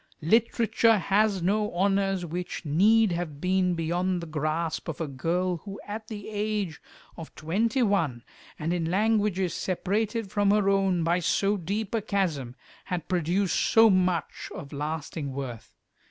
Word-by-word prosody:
Literature 225 +3 +3
has 200 0 +1
no 210 +3 +1
honours 195 0 +1
which 175 +1 -5
need 205 +8 +4
have 170 -4 -4
been 185 +1 +1
beyond 175 +3 -1
the 170 - -6
grasp 155 +1 -2
of 165 - -5
a 165 - -2
girl 175 +6 -1
who 195 +4 -9
at 215 +1 -6
the 210 -3 -7
age 210 -5 -2 0.4
of 165 -2 -9
twenty 220 - 0
one, 160 - 0 0.3
and 160 +3 -2
in 170 -2 -1
languages 205 -2 +1
separated 205 +3 -2
from 205 -1 +2
her 205 -1 +3
own 190 -3 +2
by 170 +2 +2
so 195 +3 +1
deep 200 +4 -3
a 225 - +1
chasm, 170 - -1 0.3
had 175 -4 -4
produced 180 +2 0
so 225 -1 +5
much 180 -3 0
of 140 - -8
lasting 150 -1 -4
worth. 130 -4 -6
185 Hz, 150 wpm, -27 LUFS, 165-205 Hz, 0.4 s, so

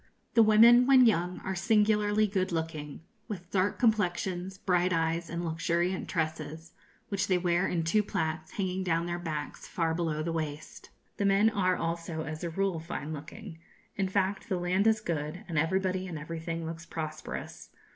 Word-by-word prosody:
The 230 - +6
women, 230 +3 +7
when 260 -2 +7
young, 180 -5 +2
are 190 - -3
singularly 210 +1 +3
good 190 -2 -1
looking, 160 -3 -4 0.3
with 180 -6 -7
dark 190 +1 +1
complexions, 190 -4 0
bright 180 -2 +1
eyes, 165 0 0
and 170 +1 -3
luxuriant 170 +3 -1
tresses, 160 0 -3 0.4
which 200 -1 -1
they 185 - +3
wear 175 +1 +1
in 170 -2 -1
two 190 +7 +3
plaits, 160 -5 -3
hanging 190 -1 -2
down 170 -2 0
their 175 0 -3
backs 155 -4 -5
far 165 -2 0
below 160 -2 -1
the 165 - -2
waist. 155 +8 -5 0.3
The 205 - 0
men 200 +3 +4
are 185 -3 +2
also, 165 -1 -3
as 155 +1 -6
a 170 - -1
rule, 190 0 -1
fine 160 -1 -5
looking. 165 +4 -9 0.4
In 195 -2 0
fact, 195 +2 -1
the 185 - 0
land 180 +4 +1
is 220 -1 +3
good, 155 -2 -3
and 165 -4 0
everybody 185 +3 0
and 170 -3 -5
everything 165 +2 -5
looks 165 +1 -7
prosperous. 155 -2 -6
175 Hz, 170 wpm, -29 LUFS, 165-195 Hz, 0.4 s, women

